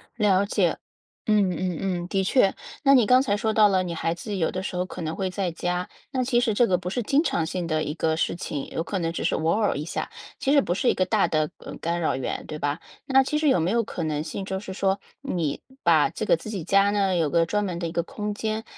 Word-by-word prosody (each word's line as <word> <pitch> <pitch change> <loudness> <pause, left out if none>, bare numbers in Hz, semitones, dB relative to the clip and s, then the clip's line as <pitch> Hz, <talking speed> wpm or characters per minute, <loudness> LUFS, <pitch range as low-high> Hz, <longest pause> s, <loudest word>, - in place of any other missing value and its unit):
了 200 -3 +3
解。 - - +1 0.5
嗯 205 -3 +4
嗯 180 -1 -2
嗯， 180 -2 -2
的 195 0 0
确。 195 0 +3 0.3
那 275 0 +6
你 245 -5 +6
刚 255 +3 +5
才 220 -7 +1
说 220 +1 0
到 215 -1 +6
了， 190 -2 +2
你 175 -2 -4
孩 165 +1 -1
子 205 +2 -5
有 165 - +1
的 185 - -4
时 180 - -4
候 180 - 0
可 185 -1 -8
能 160 0 -3
会 190 -2 -2
在 185 -2 -2
家， 180 +2 -2 0.2
那 255 -1 0
其 240 -1 +2
实 225 -3 +1
这 235 +3 +4
个 180 -2 +2
不 180 0 -5
是 245 +3 -2
经 280 +7 +3
常 170 - 0
性 175 0 -3
的 155 -1 0
一 150 - -3
个 160 -1 +1
事 - - 0
情， 145 -5 -5
有 160 - -3
可 195 +3 -3
能 165 -1 -1
只 170 - -3
是 - - +2
偶 160 +1 +1
尔 215 -1 +1
一 150 - -3
下， 165 - -4 0.3
其 275 - +1
实 285 - +6
不 175 - -1
是 240 - +1
一 - - +4
个 185 - +1
大 210 +2 +2
的， 155 -1 0
呃， - - -9
干 170 +1 -1
扰 160 - 0
源， 130 - -4
对 155 - -5
吧？ 145 +2 -1 0.3
那 270 0 +5
其 300 +3 0
实 300 -2 +2
有 180 - +4
没 170 +4 +1
有 230 0 +2
可 175 - -5
能 155 -1 -1
性， 190 +5 -5
就 190 0 -3
是 190 - -7
说， 195 0 0 0.2
你 170 - -2 0.2
把 - - +4
这 - - -4
个 - - +4
自 215 - -9
己 195 -6 -4
家 195 +3 +3
呢， 195 -3 +1
有 160 -3 +1
个 165 +1 +3
专 210 +4 0
门 175 -3 -3
的 170 - -2
一 - - -7
个 170 0 0
空 210 +4 -4
间， 220 +1 -3
185 Hz, 295 characters per minute, -25 LUFS, 170-210 Hz, 0.5 s, 那